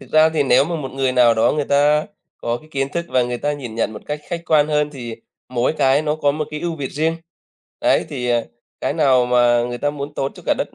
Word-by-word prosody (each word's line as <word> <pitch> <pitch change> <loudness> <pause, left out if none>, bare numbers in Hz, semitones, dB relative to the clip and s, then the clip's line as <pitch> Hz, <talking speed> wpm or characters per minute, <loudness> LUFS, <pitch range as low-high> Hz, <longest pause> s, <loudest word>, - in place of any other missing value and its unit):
Thực - - -14
ra 155 0 +6
thì 155 -2 +1
nếu 135 +1 +4
mà 170 +1 -3
một 135 -4 -5
người 135 -1 0
nào 120 -2 +5
đó 110 - +3
người 150 -1 -1
ta 150 +4 +3 0.3
có 120 0 -2
cái 155 - -16
kiến 135 -1 -1
thức 170 0 -2
và 125 - +2
người 120 0 -3
ta 145 - -1
nhìn 125 -6 -7
nhận 115 -1 -1
một 105 - -9
cách 150 0 -4
khách 170 -1 -4
quan 150 -2 +3
hơn, 150 -1 +1
thì 120 -5 -7 0.3
mỗi 125 +3 0
cái 140 -1 +2
nó 150 -1 0
có 145 -2 +2
một 155 +1 -2
cái 150 0 -5
ưu 170 -2 -3
việt 140 -3 -4
riêng, 160 +3 0 0.6
ấy. - - +2
Thì, 125 -1 -4
à, 120 -1 +1 0.4
cái - - 0
nào 130 -3 +3
mà 120 -1 +3
người 120 0 -5
ta 145 - 0
muốn 145 0 -6
tốt 135 - -2
cho - - -13
cả - - +3
đất - - -4
140 Hz, 270 wpm, -20 LUFS, 125-150 Hz, 0.6 s, ra